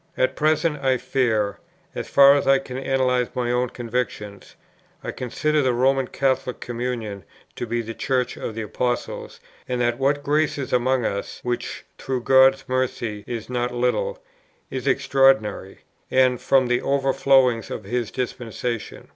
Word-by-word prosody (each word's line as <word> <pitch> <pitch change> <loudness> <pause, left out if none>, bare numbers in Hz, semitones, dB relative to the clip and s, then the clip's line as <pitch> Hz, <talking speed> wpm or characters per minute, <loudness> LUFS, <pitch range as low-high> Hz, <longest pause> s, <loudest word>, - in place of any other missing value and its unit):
At 130 +1 +1
present 155 0 +1
I 130 -1 +3
fear, 110 -7 0 0.3
as - - -5
far 140 0 +7
as 140 - 0
I 135 0 +6
can 135 -1 -7
analyze 130 -2 +1
my 120 -1 -1
own 125 0 +1
convictions, 115 -4 -5 0.5
I - - -3
consider 150 +5 -1
the 130 -2 +2
Roman 135 +1 +2
Catholic 130 -1 -1
Communion 115 -5 -4 0.3
to 120 - -4
be 120 +1 -1
the 115 +1 -6
Church 125 +3 -1
of 110 - -6
the 115 - -3
Apostles, 120 +3 -3 0.3
and 125 -1 -1
that 120 0 0
what 140 +1 +1
grace 150 +2 +1
is 140 - -4
among 125 0 +2
us 100 0 -3
(which, 120 -1 -4
through 130 -2 -3
God's 135 +1 +5
mercy, 120 -5 -2
is 115 -2 -5
not 125 -1 -2
little) 125 - 0 0.5
is - - -4
extraordinary, 135 -8 +2 0.3
and 130 -1 +3
from 135 -1 +3
the 120 0 +1
overflowings 135 -3 +2
of 110 - -5
His 120 +2 -2
dispensation. 120 -2 -5
125 Hz, 155 wpm, -23 LUFS, 120-135 Hz, 0.5 s, far